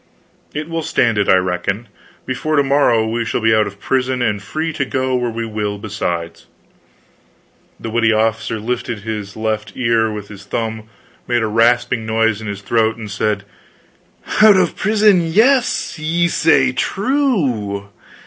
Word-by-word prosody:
"It 150 +1 -5
will 165 0 -3
stand 120 -8 +1
it, 100 - +1
I - - +7
reckon. 95 +4 -1 0.4
Before 155 +4 -2
to 145 - +4
morrow 135 -5 +3
we 115 +1 -1
shall 115 - -2
be 110 -1 +3
out 110 -1 +3
of 100 0 -9
prison, 130 +1 0
and 105 -3 0
free 155 +10 -3
to 140 - -1
go 130 -1 -1
where 125 -1 0
we 115 0 -4
will, 105 -2 -3
besides." 85 -5 -4 1.3
The 115 - -6
witty 115 0 +2
officer 110 +1 0
lifted 120 +1 -3
at 100 - -14
his 105 -2 -5
left 110 -1 -2
ear 115 -3 +1
with 105 -1 -7
his 100 -2 -11
thumb, 110 -1 -4 0.4
made 120 -1 +1
a - - 0
rasping 115 +1 +2
noise 110 -1 +1
in 110 - -6
his 100 -1 -5
throat, 110 +2 +1
and 110 -3 -8
said: 105 -1 -1 1.0
"Out 215 -2 +8
of 180 -3 +1
prison 210 -3 +3
yes 220 - +2
ye 170 +3 +1
say 160 -4 +3
true. 135 - -1
115 Hz, 165 wpm, -18 LUFS, 105-140 Hz, 1.3 s, Out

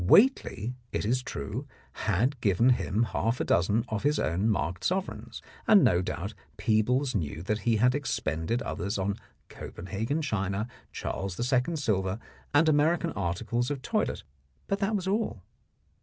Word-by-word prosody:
Whately, 125 - +4 0.2
it - - -1
is 125 +4 +1
true, 125 +1 -5 0.2
had 120 +6 0
given 105 +4 +4
him 110 -2 +1
half 115 +1 0
a - - +1
dozen 105 +7 +2
of 110 -2 -1
his 145 +1 +2
own 90 +8 +1
marked 90 -3 -1
sovereigns, 190 +1 -2 0.2
and 205 -4 +7
no 90 0 +4
doubt 95 +2 -4 0.2
Peebles 125 +5 +2
knew 80 -5 -2
that 105 +3 -1
he 115 - +4
had 125 +4 +4
expended 115 - -1
others 100 +4 -2
on 100 +1 -1 0.3
Copenhagen 110 - -4
china, 100 -4 -1 0.2
Charles 95 -2 -4 0.2
II. 130 +7 +2
silver 100 -9 0 0.3
and 150 +3 +5
American 160 +3 +3
articles 105 +5 -1
of 140 -3 -3
toilet, - - -1 0.4
but 200 - -1
that 205 +2 +1
was 190 -2 -2
all. 200 - -1
115 Hz, 150 wpm, -29 LUFS, 100-145 Hz, 0.4 s, and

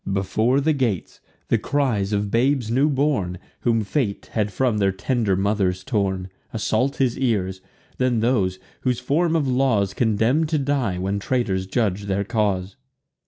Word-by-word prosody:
Before 110 +7 +1
the 155 +3 +2
gates, 120 - -2 0.3
the 115 - +3
cries 115 -6 0
of 100 -1 -1
babes 120 0 +1
new 135 +5 +3
born, 130 -11 0 0.2
Whom 115 -2 +1
fate 105 -2 -2
had 105 -2 0
from 115 0 +1
their 100 -1 +3
tender 100 +1 0
mothers 95 -2 0
torn, 95 -6 -1 0.2
Assault 115 +4 0
his 130 -3 0
ears: 95 -7 0 0.4
then 125 -3 +2
those, 105 -6 +1 0.2
whom 125 -1 0
form 165 +7 +1
of 150 -4 +1
laws 125 -7 +2
Condemn'd 120 +8 +2
to 155 - +1
die, 135 -9 0
when 95 +2 -1
traitors 100 -5 -1
judg'd 100 -2 -1
their 100 0 0
cause. 100 -1 -1
110 Hz, 155 wpm, -23 LUFS, 100-130 Hz, 0.4 s, the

